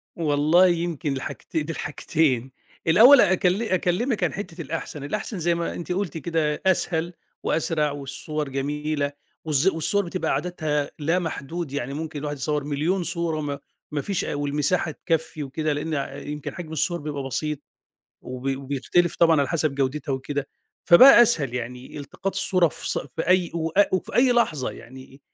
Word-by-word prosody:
والله 155 Hz, +3 st, +4 dB
يمكن 170 Hz, -4 st, -1 dB
الحاجتين، 150 Hz, +4 st, -4 dB
دي 165 Hz, -, -4 dB
الحاجتين، 135 Hz, -4 st, 0 dB, 0.4 s
الأول 240 Hz, +11 st, +8 dB
أكل 185 Hz, +3 st, +2 dB
أكلّمِك 195 Hz, +4 st, 0 dB
عن -, -, +1 dB
حتّة 180 Hz, -4 st, -6 dB
الأحسن، 155 Hz, -1 st, -5 dB
الأحسن 205 Hz, +5 st, -4 dB
زي 170 Hz, +1 st, +1 dB
ما 170 Hz, 0 st, -2 dB
أنتِ 175 Hz, +1 st, -6 dB
قلتِ 180 Hz, -4 st, -2 dB
كده 155 Hz, -1 st, -1 dB
أسهل 175 Hz, -2 st, +1 dB, 0.3 s
وأسرع 155 Hz, -2 st, 0 dB
والصور 145 Hz, +1 st, -4 dB
جميلة، 145 Hz, +1 st, -2 dB, 0.3 s
والز 155 Hz, +3 st, +2 dB
والصور 195 Hz, +3 st, +1 dB
بتبقى 180 Hz, +2 st, -2 dB
عددها 155 Hz, -5 st, -1 dB
لا 165 Hz, +5 st, +1 dB
محدود، 165 Hz, -1 st, -4 dB
يعني 140 Hz, -1 st, -3 dB
ممكن 155 Hz, -1 st, -5 dB
الواحد 145 Hz, 0 st, -4 dB
يصوّر 150 Hz, +1 st, -1 dB
مليون 155 Hz, +6 st, 0 dB
صورة، 170 Hz, -2 st, -2 dB
وما 145 Hz, -2 st, -3 dB, 0.3 s
ما 145 Hz, -1 st, -1 dB
فيش 195 Hz, +1 st, -2 dB
والمساحة 145 Hz, +3 st, 0 dB
تكفّي 160 Hz, -1 st, -2 dB
وكده، 150 Hz, +2 st, -2 dB
لأن 145 Hz, -1 st, -3 dB
يمكن 150 Hz, -1 st, -5 dB
حجم 170 Hz, -3 st, -7 dB
الصور 170 Hz, +3 st, 0 dB
بيبقى 145 Hz, -2 st, -4 dB
بسيط، 150 Hz, +2 st, -2 dB, 0.6 s
وبي 130 Hz, +1 st, -3 dB
وبيختلف 140 Hz, +6 st, 0 dB
طبعًا 165 Hz, -3 st, +5 dB
على 140 Hz, -, 0 dB
حَسَب 155 Hz, -4 st, 0 dB
جودتها 135 Hz, +1 st, -1 dB
وكده، 140 Hz, +1 st, -3 dB, 0.4 s
فبقى 240 Hz, +7 st, +10 dB
أسهل 140 Hz, -, +1 dB
يعني 125 Hz, +3 st, -6 dB
إلتقاط 165 Hz, +7 st, -5 dB
الصورة 185 Hz, -3 st, +3 dB
في -, -, -7 dB
ص -, -, 0 dB
في 145 Hz, +4 st, -5 dB
أي 185 Hz, -1 st, +3 dB
و 165 Hz, -1 st, -1 dB, 0.2 s
وفي 185 Hz, -, -2 dB
أي 250 Hz, 0 st, +5 dB
لحظة، 155 Hz, -, +1 dB
يعني 130 Hz, +2 st, -13 dB
155 Hz, 155 wpm, -24 LUFS, 145-175 Hz, 0.6 s, فبقى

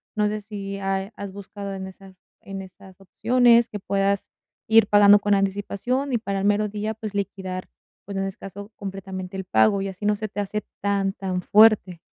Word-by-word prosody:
No 210 Hz, 0 st, +2 dB
sé 210 Hz, 0 st, -3 dB
si 200 Hz, -1 st, -6 dB
ha 195 Hz, +1 st, -2 dB
has 200 Hz, -1 st, -7 dB
buscado 200 Hz, 0 st, -7 dB
en 190 Hz, 0 st, -6 dB
esas 190 Hz, 0 st, -14 dB, 0.3 s
en 195 Hz, -1 st, -7 dB
esas 190 Hz, 0 st, -14 dB
opciones, 235 Hz, +3 st, +3 dB
que 205 Hz, -, -6 dB
puedas 195 Hz, 0 st, 0 dB, 0.4 s
ir 220 Hz, -1 st, +6 dB
pagando 205 Hz, 0 st, +7 dB
con 205 Hz, 0 st, +1 dB
anticipación 205 Hz, +7 st, -1 dB
y -, -, +3 dB
para 200 Hz, -3 st, -3 dB
el 195 Hz, -, -1 dB
mero 210 Hz, +1 st, +2 dB
día, 215 Hz, +1 st, -3 dB
pues 215 Hz, -1 st, -7 dB
liquidar, 190 Hz, -2 st, -4 dB, 0.4 s
pues, 200 Hz, 0 st, -7 dB
en 195 Hz, -, 0 dB
ese 195 Hz, -, -6 dB
caso 200 Hz, +2 st, -9 dB
completamente 190 Hz, -1 st, -7 dB
el 190 Hz, -, -4 dB
pago, 110 Hz, -, +3 dB
y 195 Hz, -, -2 dB
así 190 Hz, +2 st, -7 dB
no 210 Hz, 0 st, +3 dB
se 215 Hz, +1 st, -4 dB
te 205 Hz, -, -6 dB
hace 210 Hz, +1 st, -2 dB, 0.2 s
tan, 200 Hz, -1 st, +1 dB
tan 185 Hz, -2 st, -3 dB
fuerte. 210 Hz, -4 st, +5 dB
200 Hz, 200 wpm, -24 LUFS, 195-210 Hz, 0.4 s, pagando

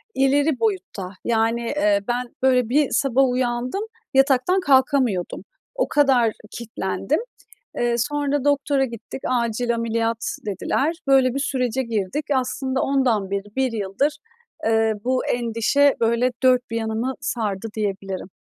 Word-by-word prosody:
ileri 275 Hz, +1 st, +2 dB
boyutta. 380 Hz, -, -2 dB, 0.2 s
Yani, 230 Hz, 0 st, +1 dB
eee, 230 Hz, -5 st, +1 dB
ben, 245 Hz, 0 st, -3 dB
böyle, 250 Hz, -3 st, +3 dB
bir 290 Hz, +3 st, +3 dB
sabah 270 Hz, -1 st, +2 dB
uyandım, 250 Hz, -, -1 dB, 0.3 s
yataktan 270 Hz, +7 st, +3 dB
kalkamıyordum, 260 Hz, -, +2 dB, 0.3 s
o -, -, 0 dB
kadar 260 Hz, -6 st, +3 dB, 0.2 s
kilitlendim. 235 Hz, +5 st, -2 dB, 0.6 s
Eee, 240 Hz, 0 st, +1 dB
sonra 290 Hz, +2 st, -1 dB
doktora 285 Hz, -1 st, +2 dB
gittik, 235 Hz, +1 st, -8 dB
acil 235 Hz, -1 st, 0 dB
ameliyat 230 Hz, 0 st, -1 dB
dediler. 265 Hz, -, -1 dB
Böyle 265 Hz, -2 st, +4 dB
bir 275 Hz, -, -2 dB
sürece 260 Hz, -2 st, -1 dB
girdik. 230 Hz, +4 st, -2 dB
Aslında 260 Hz, +1 st, -1 dB
ondan 245 Hz, -8 st, +1 dB
beri, 200 Hz, +1 st, -4 dB
1 265 Hz, -1 st, +1 dB
yıldır, 220 Hz, +7 st, -1 dB, 0.5 s
eee, 225 Hz, 0 st, +3 dB
bu 255 Hz, +1 st, 0 dB
endişe, 240 Hz, +4 st, +2 dB
böyle, 235 Hz, +2 st, +2 dB
dört 255 Hz, -1 st, +5 dB
bir 230 Hz, -, -1 dB
yanımı 225 Hz, +3 st, -2 dB
sardı 220 Hz, -3 st, -2 dB
diyebilirim. 195 Hz, -3 st, -3 dB
245 Hz, 125 wpm, -22 LUFS, 225-270 Hz, 0.6 s, dört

